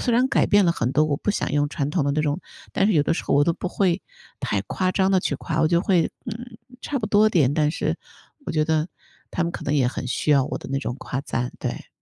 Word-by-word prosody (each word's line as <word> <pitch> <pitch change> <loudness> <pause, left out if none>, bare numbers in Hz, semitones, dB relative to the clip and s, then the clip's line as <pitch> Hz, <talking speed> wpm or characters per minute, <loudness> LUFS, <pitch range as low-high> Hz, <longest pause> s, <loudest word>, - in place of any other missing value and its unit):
虽 245 - 0
然 250 +2 +3
改 - - +3
变 205 -1 +5
了 170 - +4
很 125 -5 -1
多， 155 +1 +4
我 145 -2 0
不 - - -7
想 - - -1
用 145 0 +2
传 145 -2 -2
统 155 -3 +1
的 140 - +1
那 150 - +1
种， 150 +3 -1 0.3
但 195 - +2
是 215 - +3
有 150 - +4
的 165 - +1
时 - - -4
候 - - +1
我 145 - +5
都 170 - +2
不 180 - -4
会 185 -1 +1 0.4
太 100 - 0
夸 185 - -1
张 190 0 +2
地 190 - +4
去 - - -1
夸， 160 0 -2
我 160 - +4
就 170 0 +3
会， 180 -4 +3 0.2
嗯， 230 0 -7 0.2
差 280 - -2
不 215 - -1
多 210 +1 +5
点， 150 -10 +3
但 150 -1 +2
是 - - -1 0.5
我 - - -2
觉 155 -1 +2
得， 160 +1 +1 0.4
他 175 - -1
们 170 - -1
可 - - -6
能 145 - 0
也 135 -4 +3
很 125 - -5
需 150 - -1
要 140 -2 +5
我 - - -4
的 - - -9
那 135 - +1
种 120 - -3
夸 135 - -4
赞， 125 -2 -3
对。 - - -5
160 Hz, 300 characters per minute, -23 LUFS, 145-195 Hz, 0.5 s, 变